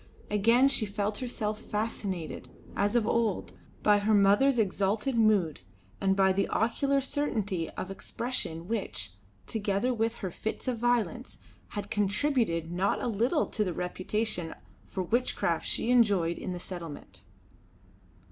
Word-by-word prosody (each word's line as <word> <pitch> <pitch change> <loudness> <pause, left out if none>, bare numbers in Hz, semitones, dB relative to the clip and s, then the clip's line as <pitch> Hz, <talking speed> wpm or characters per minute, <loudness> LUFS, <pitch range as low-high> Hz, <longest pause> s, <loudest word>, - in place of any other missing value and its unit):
Again 230 +6 +5
she 255 -6 +2
felt 205 +1 -2
herself 215 -4 -2
fascinated, 205 -5 -3 0.3
as 205 +3 +1
of 235 -3 +3
old, 225 -3 0 0.3
by 210 -1 +5
her 210 +1 +3
mother's 205 +7 +5
exalted 210 +4 +1
mood 210 -8 +3 0.4
and 195 -1 +3
by 190 -1 +4
the 195 +1 0
oracular 275 +5 +1
certainty 215 - -1
of 185 - -4
expression 195 -6 -3
which, 190 - -2 0.3
together 210 +3 0
with 225 0 0
her 190 -6 -5
fits 220 +8 -5
of 245 -3 -1
violence, 240 - 0 0.4
had 205 0 -4
contributed 205 - +1
not 185 +3 +1
a - - -3
little 240 - +1
to 215 - 0
the 180 -4 -2
reputation 180 0 -2 0.3
for 185 - -3
witchcraft 240 +8 0
she 240 - 0
enjoyed 200 -9 +3
in 185 - -4
the 180 - -4
settlement. 170 -4 -8
210 Hz, 140 wpm, -29 LUFS, 190-235 Hz, 0.4 s, Again